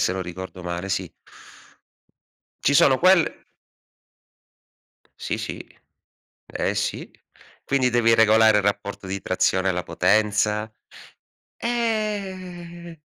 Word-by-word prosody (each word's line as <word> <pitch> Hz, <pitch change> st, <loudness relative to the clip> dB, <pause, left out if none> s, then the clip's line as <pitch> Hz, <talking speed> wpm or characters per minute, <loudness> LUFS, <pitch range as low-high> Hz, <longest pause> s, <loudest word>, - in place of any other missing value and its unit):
se 90 Hz, -, +1 dB
non 95 Hz, -, -3 dB
ricordo 90 Hz, +1 st, -8 dB
male, 90 Hz, +2 st, -4 dB
sì. 95 Hz, -, -2 dB, 1.6 s
Ci 140 Hz, -, +3 dB
sono 135 Hz, -2 st, +5 dB
quelle 185 Hz, -2 st, +3 dB, 1.8 s
Sì, -, -, -2 dB
sì. -, -, -5 dB, 0.9 s
Eh, -, -, -2 dB
sì. -, -, -3 dB, 0.5 s
Quindi 130 Hz, -2 st, +1 dB
devi 115 Hz, -1 st, +3 dB
regolare 110 Hz, -1 st, +5 dB
il -, -, 0 dB
rapporto 100 Hz, -1 st, -2 dB
di 95 Hz, +1 st, -3 dB
trazione 95 Hz, +1 st, +1 dB
alla 90 Hz, -1 st, -2 dB
potenza. 105 Hz, +3 st, +1 dB, 0.9 s
Eh 190 Hz, -8 st, -4 dB
110 Hz, 100 wpm, -23 LUFS, -, 1.8 s, sono